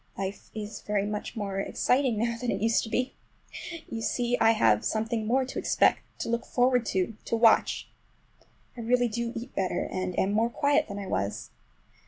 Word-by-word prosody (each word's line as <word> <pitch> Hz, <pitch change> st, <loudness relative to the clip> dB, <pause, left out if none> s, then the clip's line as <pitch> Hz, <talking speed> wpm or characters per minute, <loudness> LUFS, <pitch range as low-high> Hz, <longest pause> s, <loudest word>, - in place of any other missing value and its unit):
Life 195 Hz, +1 st, -5 dB
is 215 Hz, 0 st, -6 dB
very 205 Hz, -1 st, 0 dB
much 210 Hz, +3 st, -4 dB
more 200 Hz, -3 st, -3 dB
exciting 250 Hz, +3 st, +1 dB
now 235 Hz, +2 st, 0 dB
than 240 Hz, +1 st, -4 dB
it 195 Hz, -, 0 dB
used 225 Hz, +2 st, +3 dB
to -, -, -7 dB
be. 250 Hz, +3 st, -1 dB, 0.7 s
You 225 Hz, -, -5 dB
see 245 Hz, +1 st, 0 dB
I 225 Hz, -, +5 dB
have 110 Hz, -, +3 dB
something 220 Hz, 0 st, -1 dB
more 260 Hz, +3 st, +2 dB
to 260 Hz, -, -4 dB
expect, -, -, +3 dB, 0.2 s
to -, -, -3 dB
look 235 Hz, 0 st, 0 dB
forward 250 Hz, -1 st, +2 dB
to, 190 Hz, +3 st, 0 dB
to -, -, 0 dB
watch. 225 Hz, -1 st, +4 dB, 0.9 s
I -, -, -10 dB
really 245 Hz, +1 st, +2 dB
do 235 Hz, +1 st, -3 dB
eat 240 Hz, +3 st, -6 dB
better, 185 Hz, -2 st, -1 dB
and 185 Hz, -1 st, -3 dB
am 195 Hz, -, +2 dB
more 225 Hz, +3 st, +2 dB
quiet 285 Hz, +4 st, +2 dB
than 200 Hz, -, -6 dB
I 200 Hz, -, -5 dB
was. 100 Hz, -, -3 dB
225 Hz, 190 wpm, -28 LUFS, 200-240 Hz, 0.9 s, I